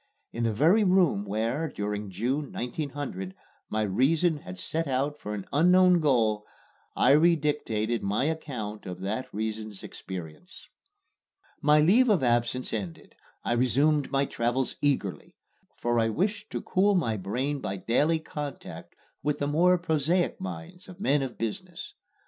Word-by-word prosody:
In 115 0 -1
the 115 - +2
very 165 - +4
room 180 - +3
where, 115 +10 -1
during 105 -3 -4
June, 130 +9 -2
1900, 125 - -5 0.3
my 110 0 0
reason 150 - +2
had 90 -10 -9
set 160 - -2
out 140 +3 -1
for 105 0 -5
an 100 - -6
unknown 180 +3 +5
goal, 115 -8 +2 0.5
I 125 - +4
redictated 150 -8 +2
my 105 +7 0
account 125 -11 -4
of 90 0 -7
that 110 +6 -3
reason's 110 -1 -4
experiences. 90 - -9 0.9
My 150 0 +5
leave 225 +11 +5
of 190 -10 +3
absence 120 +1 0
ended, 95 -7 -5 0.3
I - - -2
resumed 135 +5 +2
my 140 0 +1
travels 120 +1 -1
eagerly; 135 -10 -1 0.4
for 120 0 +1
I 115 0 +2
wished 200 - -1
to - - -3
cool 200 +2 +2
my 120 -12 +1
brain 125 +9 -2
by 100 -3 -3
daily 145 - +2
contact 150 -3 -7 0.3
with 150 -1 0
the 145 - -1
more 175 +5 +4
prosaic 170 +1 0
minds 90 - -7
of 180 0 -12
men 145 -8 +2
of 130 -3 -5
business. 165 - -5
135 Hz, 145 wpm, -27 LUFS, 110-160 Hz, 0.9 s, unknown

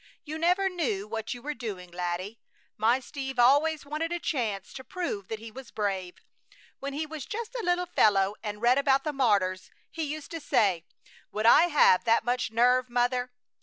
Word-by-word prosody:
"You 310 0 -6
never 360 +4 +2
knew 245 - -2
what 220 +2 -4
you 240 - -12
were 300 - -3
doing, 195 -9 -7
laddie! 180 +5 -4 0.4
My 230 +4 +2
Steve 270 0 -6
always 285 +5 +4
wanted 305 +3 -3
a 345 - 0
chance 220 - -2
to 260 - -8
prove 250 - -4
that 220 - -4
he 225 +1 -10
was 260 +1 -10
brave. 190 -4 -3 0.6
When 280 0 -5
he 305 +3 -2
was 310 -3 -7
just 465 +2 -5
a - - -3
little 355 -1 +1
fellow 200 - +3
and 210 0 -6
read 250 +3 +5
about 275 -1 +3
the 300 - -2
martyrs, 200 -8 +1 0.2
he 325 - -5
used 305 0 -5
to 330 - -4
say: 195 - +1 0.5
'Would 215 +1 -2
I 305 +9 +7
have 290 - +5
that 230 0 +3
much 245 0 0
nerve, 250 +3 +3
mother? 245 +1 0
250 Hz, 190 wpm, -28 LUFS, 210-300 Hz, 0.6 s, I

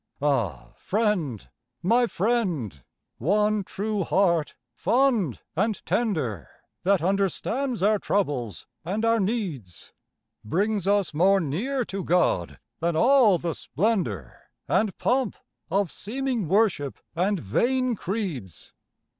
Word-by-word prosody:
Ah, 115 - 0
friend, 180 - -1 0.4
my 235 +6 +4
friend! 175 - -1 0.4
one 210 - +2
true 205 +1 -2
heart, 170 -4 +1 0.2
fond 230 - +1
and 215 +5 -1
tender, 145 - -1 0.3
That 190 -3 +2
understands 200 +6 0
our 210 +1 +4
troubles 125 - -1 0.2
and 200 +7 -1
our 230 0 +3
needs, 185 - -3 0.5
Brings 195 - 0
us 200 -5 +2
more 190 +6 +4
near 225 - -1
to 195 -2 -4
God 165 - +1 0.2
than 170 0 0
all 235 - +5
the 170 -1 -3
splendour 200 - -2 0.2
And 210 -5 +1
pomp 255 -3 +1 0.3
of 200 -2 +1
seeming 245 -2 -2
worship 190 -7 +1 0.2
and 190 +3 +1
vain 250 - +1
creeds. 175 - -5
195 Hz, 110 wpm, -25 LUFS, 155-220 Hz, 0.5 s, all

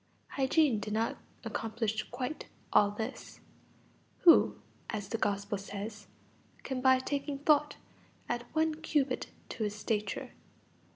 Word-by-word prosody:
Hygiene 270 -3 +3
did 210 0 -4
not 225 +1 0 0.3
accomplish 220 -1 -2
quite 255 +4 -4 0.3
all 205 - +6
this. 220 +5 -6 0.8
Who, 340 -3 +7 0.3
as 205 -4 -4
the 225 - -2
Gospel 200 -1 0
says, 205 +1 -6 0.6
can 265 -2 -3
by 260 0 +6
taking 280 +2 -2
thought 295 0 +3 0.5
add 240 - -1
one 315 0 +2
cubit 295 -4 0 0.2
to 225 - -3
his 210 -1 -1
stature? 210 -1 -2
230 Hz, 120 wpm, -32 LUFS, 210-280 Hz, 0.8 s, Who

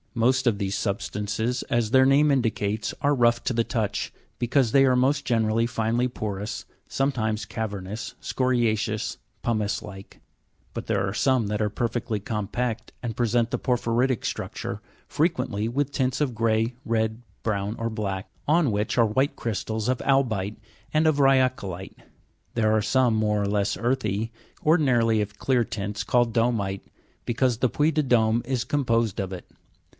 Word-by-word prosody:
Most 130 +3 +2
of 110 -4 +3
these 100 -1 -2
substances, 105 +4 -2
as 120 -4 +1
their 130 0 +6
name 145 +2 +5
indicates, 110 -5 0
are 145 +1 +3
rough 120 -1 +3
to - - +1
the 115 0 +2
touch, 110 -4 -2 0.3
because 120 -1 +2
they 135 +2 +6
are 130 -2 +4
most 140 +3 +2
generally 115 -1 +2
finely 120 +1 0
porous, 105 -3 -4 0.2
sometimes 110 -6 0
cavernous, 105 0 -5
scoria'ceous, 115 -4 0 0.2
pumice 110 -3 0
like; 95 -2 -11 0.5
but - - -6
there - - +1
are 95 - -3
some 130 -1 +2
that 105 +1 -1
are 105 - +1
perfectly 115 0 -2
compact, 110 +3 -3
and 115 -3 -3
present 120 0 +1
the - - -1
porphyri'tic 125 -1 +1
structure, - - -4 0.3
frequently 130 - 0
with 140 +3 -1
tints 130 -2 0
of 140 -6 0
grey, 115 +1 +1
red, 110 0 -1 0.2
brown, 105 -1 -1
or 115 0 -2
black, 100 -3 -3 0.2
on 155 -3 +3
which 105 +3 -1
are 115 - +6
white 130 +6 +1
crystals 110 0 -3
of 130 -1 +1
albi'te 110 -7 +1 0.4
and 155 +1 +3
of 155 -2 +3
rya'colite. 130 -9 +1 0.6
There 110 -2 +3
are 110 - +3
some, 125 +1 +2
more 105 -1 +1
or - - 0
less 100 -1 0
earthy, 115 -1 -1 0.3
ordinarily 125 -9 +3
of 105 0 -5
clear 125 -3 +2
tints, 105 -2 -4
called 120 -2 +2
domi'te, 110 -5 0 0.4
because 120 -1 0
the 130 - +2
Puy 150 +7 +2
de 155 0 +1
Dome 115 -3 +3
is 125 -1 -1
composed 115 -7 0
of 95 -1 -4
it. 90 - -7
115 Hz, 160 wpm, -25 LUFS, 105-130 Hz, 0.6 s, their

